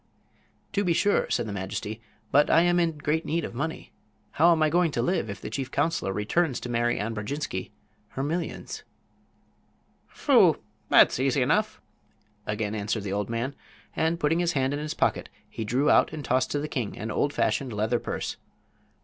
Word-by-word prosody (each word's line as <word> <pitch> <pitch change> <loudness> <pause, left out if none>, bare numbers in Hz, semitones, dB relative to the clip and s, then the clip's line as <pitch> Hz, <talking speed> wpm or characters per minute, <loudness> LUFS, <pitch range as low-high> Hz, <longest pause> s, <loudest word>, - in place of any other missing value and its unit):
"To 200 0 +1
be 175 -3 +2
sure," 205 +5 +2
said - - 0
the 105 - -5
majesty. 100 +3 -4 0.3
"But 145 +2 +4
I 165 - +6
am 175 0 +3
in 165 -3 +1
great 150 +2 0
need 165 +1 -1
of - - -7
money. 155 +6 -4 0.4
How 170 +3 +5
am 160 -2 +3
I 155 - +3
going 175 0 +3
to 120 - 0
live 175 - 0
if 100 -1 -6
the - - -7
chief 135 -2 -3
counselor 145 -7 0
returns 125 - 0
to 125 - -6
Mary 120 0 +1
Ann 110 +3 -2
Brodjinski 105 -2 -4 0.5
her 135 - 0
millions?" 165 +3 -3 1.3
"Phoo! - - +4 0.3
that's - - +6
easy 135 0 +2
enough," 210 +11 +1 0.7
again 105 0 -2
answered 105 0 -2
the 100 +1 -1
man, 115 +4 -2 0.4
and, 165 +1 +1
putting 165 +1 +2
his 175 -1 +1
hand 135 0 +1
in 145 - -2
his 150 0 -4
pocket, - - 0 0.2
he 110 - -5
drew 130 +7 +2
out - - +4
and 150 -3 -6
tossed 130 +1 +1
to 145 - -1
the 150 - -3
king 125 -8 -3
an 110 +1 -4
old 145 - +1
fashioned 135 -2 0
leather 110 +3 0
purse. - - -4
140 Hz, 185 wpm, -27 LUFS, 110-160 Hz, 1.3 s, I